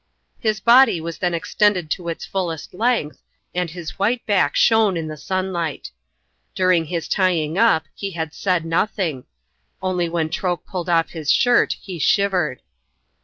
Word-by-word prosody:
His 215 -2 0
body 240 -3 +5
was 165 0 -6
then 175 -2 0
extended 180 -1 +1
to 170 -1 -2
its 165 - -5
fullest 175 -5 -4
length, 205 - -1 0.3
and 180 -1 -1
his 175 +1 -8
white 230 +5 0
back 185 -9 +2
shone 220 -5 +4
in 160 -1 -3
the 155 - -6
sunlight. 180 -2 -3 0.6
During 185 -3 +3
his 165 +1 -4
tying 170 -5 +1
up 200 -7 +3
he 200 - -5
had 160 -4 -5
said 180 -4 0
nothing 165 -5 -1 0.5
only 180 -2 -1
when 165 -2 -1
Troke 180 -2 -2
pulled 180 -2 -5
off 165 -1 +2
his 155 -3 -1
shirt 245 0 +3
he 185 -4 -7
shivered. 180 -7 +1
180 Hz, 155 wpm, -21 LUFS, 165-195 Hz, 0.6 s, body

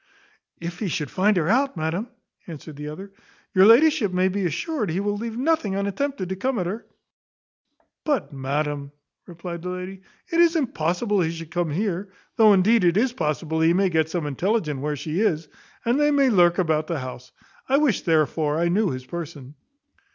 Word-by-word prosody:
"If 170 +1 -6
he 210 - -2
should 155 -5 -3
find 200 +1 +2
her 165 -3 +1
out, 260 +2 +2
madam," 160 +8 -2 0.4
answered 155 -2 -9
the 150 +1 -7
other, 190 +6 -8 0.4
"your 190 +1 +6
ladyship 250 -2 +5
may 185 +1 +2
be 190 -1 -1
assured 225 - -2
he 165 +4 -1
will 205 +1 -1
leave 225 +2 -5
nothing 265 -8 +1
unattempted 200 +1 -2
to 190 - -2
come 255 +6 -1
at 180 - -1
her." 205 +6 -5 1.2
"But, 220 - -1
madam," 140 +1 -3 0.3
replied 170 -1 -7
the 180 - -5
lady, 185 +1 -6 0.3
"it 335 - +1
is 340 0 +5
impossible 205 - 0
he 160 - +1
should 165 -1 -7
come 175 -1 -1
here 190 +3 -2 0.3
though 220 -2 +6
indeed 200 +3 +4
it 175 +1 +3
is 240 +3 +2
possible 160 - -2
he 165 +1 +4
may 195 0 +3
get 160 -2 +1
some 170 -2 -2
intelligence 150 - -1
where 150 +2 -2
she 155 +5 -3
is, 165 -8 +1 0.4
and 240 +4 +2
then 295 0 +3
may 275 -2 +4
lurk 175 -4 +4
about 155 -3 +1
the 165 - -2
house 130 -1 -8 0.4
I 270 - +4
wish 285 -8 +2
therefore 155 -2 +1
I 170 +1 +1
knew 200 +3 +2
his 130 -1 -5
person. 150 -4 -7
180 Hz, 190 wpm, -24 LUFS, 160-215 Hz, 1.2 s, your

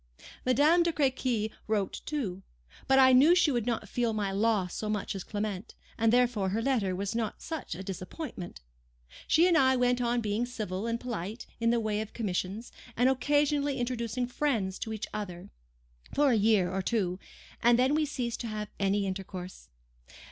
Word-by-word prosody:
Madame 295 +7 +5
de 340 0 +2
Crequy 255 -7 0 0.2
wrote 210 -3 -1
too. 215 -12 -3 0.5
But 270 - +5
I 260 -1 +7
knew 290 +7 +7
she 335 -4 +4
could 240 -3 -1
not 225 -3 -1
feel 235 +1 0
my 205 -2 -1
loss 200 -2 +1
so 215 - -3
much 210 -1 -2
as 195 -2 -5
Clement, 205 0 -4 0.2
and 225 -1 +2
therefore 240 -5 +2
her 215 +4 -1
letter 220 -9 +1
was 200 +2 -3
not 225 -2 -2
such 320 - -5
a 190 - -7
disappointment. 185 - -7 0.7
She 335 +3 +5
and 350 - +3
I 260 -3 +5
went 245 0 +2
on 240 0 +1
being 220 +2 -1
civil 215 -4 -4
and 230 0 -1
polite 225 -2 -5
in 230 0 +2
the 235 0 +3
way 215 -1 -1
of 220 - -7
commissions, 205 +1 -3 0.3
and 250 +2 +4
occasionally 290 +1 +1
introducing 240 0 -2
friends 240 -7 -1
to 220 - -4
each 215 0 -3
other, 185 -5 -6 0.6
for 290 -2 +4
a - - +4
year 205 -4 +3
or 190 +1 -1
two, 185 -3 -1 0.4
and 235 0 +5
then 260 +3 +3
we 305 0 +2
ceased 245 -4 -3
to 235 - -4
have 215 -1 -5
any 200 0 +1
intercourse. 185 - -6
230 Hz, 180 wpm, -29 LUFS, 200-255 Hz, 0.7 s, I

